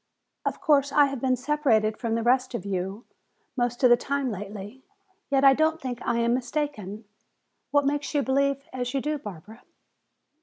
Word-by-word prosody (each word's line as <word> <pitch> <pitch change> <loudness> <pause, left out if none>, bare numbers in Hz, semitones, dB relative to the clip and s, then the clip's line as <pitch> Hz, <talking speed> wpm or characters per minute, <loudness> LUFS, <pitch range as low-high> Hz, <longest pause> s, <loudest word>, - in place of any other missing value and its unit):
Of - - -2
course, 285 -2 +3
I 290 0 +6
have 275 -3 -4
been 260 -1 +2
separated 255 -6 +1
from 230 -1 -2
the 230 - -1
rest 255 +1 +2
of 235 - -5
you 195 +3 -3 0.5
most 245 0 -1
of 250 - +7
the - - +9
time 275 +1 -2
lately, 205 +4 -7 0.5
yet 275 -1 +2
I 275 -1 +8
don't 315 +3 +1
think 250 -5 -5
I 235 - 0
am 235 0 +2
mistaken. 245 -6 -3 0.6
What 285 -1 +2
makes 290 +2 -1
you 285 - +3
believe 275 +1 0
as 250 +1 -3
you - - +2
do, 300 +2 -2
Barbara?" 210 +1 -10
255 Hz, 180 wpm, -26 LUFS, 225-280 Hz, 0.6 s, the